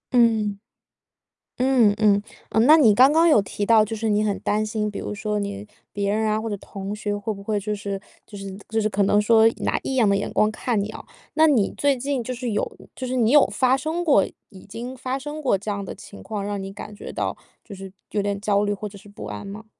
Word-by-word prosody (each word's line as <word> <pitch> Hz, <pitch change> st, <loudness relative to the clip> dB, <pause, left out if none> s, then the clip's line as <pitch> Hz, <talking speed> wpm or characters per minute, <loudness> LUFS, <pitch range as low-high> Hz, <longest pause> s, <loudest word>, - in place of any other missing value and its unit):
嗯。 220 Hz, -4 st, +3 dB, 1.0 s
嗯 250 Hz, -5 st, +4 dB
嗯， 205 Hz, -2 st, +4 dB, 0.3 s
嗯， 225 Hz, +2 st, +3 dB
那 310 Hz, +3 st, +9 dB
你 225 Hz, -8 st, +6 dB
刚 260 Hz, +6 st, +6 dB
刚 330 Hz, +2 st, +5 dB
有 260 Hz, -9 st, +6 dB
提 205 Hz, +1 st, -4 dB
到 220 Hz, -1 st, +6 dB
就 225 Hz, -, -5 dB
是 220 Hz, 0 st, -2 dB
你 210 Hz, 0 st, +2 dB
很 205 Hz, -2 st, -1 dB
担 215 Hz, +1 st, 0 dB
心， 210 Hz, -1 st, -2 dB
比 -, -, -7 dB
如 -, -, -5 dB
说 210 Hz, 0 st, -2 dB
你 200 Hz, +1 st, -5 dB, 0.2 s
别 200 Hz, -1 st, -1 dB
人 220 Hz, +1 st, 0 dB
啊， 215 Hz, 0 st, +1 dB
或 225 Hz, -, -4 dB
者 205 Hz, -, -3 dB
同 195 Hz, +1 st, -7 dB
学 205 Hz, -1 st, -3 dB
会 205 Hz, +2 st, -3 dB
不 200 Hz, -1 st, -9 dB
会 210 Hz, -1 st, -1 dB
就 210 Hz, +1 st, -2 dB
是 200 Hz, -1 st, -4 dB, 0.3 s
就 205 Hz, -, -11 dB
是 195 Hz, -1 st, -7 dB
就 220 Hz, 0 st, +1 dB
是 215 Hz, -, +1 dB
可 205 Hz, -1 st, 0 dB
能 205 Hz, +1 st, +3 dB
说 220 Hz, +1 st, +5 dB
拿 -, -, 0 dB
异 265 Hz, -, -3 dB
样 225 Hz, -5 st, +4 dB
的 200 Hz, -, +3 dB
眼 200 Hz, -, -3 dB
光 215 Hz, -, +3 dB
看 220 Hz, 0 st, -1 dB
你 210 Hz, -, -4 dB
哦。 -, -, -9 dB, 0.3 s
那 315 Hz, 0 st, +5 dB
你 245 Hz, -10 st, +3 dB
最 280 Hz, -2 st, +2 dB
近 265 Hz, -1 st, -2 dB
就 255 Hz, -, -4 dB
是 245 Hz, -1 st, -4 dB
有 -, -, -2 dB, 0.2 s
就 260 Hz, -, -4 dB
是 255 Hz, -, -3 dB
你 235 Hz, -2 st, +3 dB
有 295 Hz, -2 st, +7 dB
发 260 Hz, 0 st, +2 dB
生 315 Hz, +5 st, -2 dB
过 280 Hz, -, +4 dB, 0.2 s
已 190 Hz, -3 st, -14 dB
经 235 Hz, +5 st, -7 dB
发 255 Hz, +1 st, -3 dB
生 295 Hz, +3 st, -7 dB
过 250 Hz, -7 st, +2 dB
这 210 Hz, +2 st, -5 dB
样 200 Hz, -1 st, -3 dB
的 -, -, -7 dB
情 205 Hz, -, -12 dB
况， 210 Hz, -2 st, -4 dB
让 205 Hz, -1 st, -3 dB
你 195 Hz, 0 st, -6 dB
感 210 Hz, +1 st, -9 dB
觉 -, -, -8 dB
到 -, -, -2 dB, 0.3 s
就 205 Hz, -, -10 dB
是 190 Hz, 0 st, -9 dB, 0.2 s
有 205 Hz, -, 0 dB
点 200 Hz, 0 st, -2 dB
焦 205 Hz, 0 st, +2 dB
虑 205 Hz, -, 0 dB
或 210 Hz, +1 st, -5 dB
者 200 Hz, -, -13 dB
是 205 Hz, -, -16 dB
不 205 Hz, -, -9 dB
安 200 Hz, -, -6 dB
吗？ 210 Hz, +3 st, -9 dB
215 Hz, 275 characters per minute, -23 LUFS, 205-240 Hz, 1.0 s, 那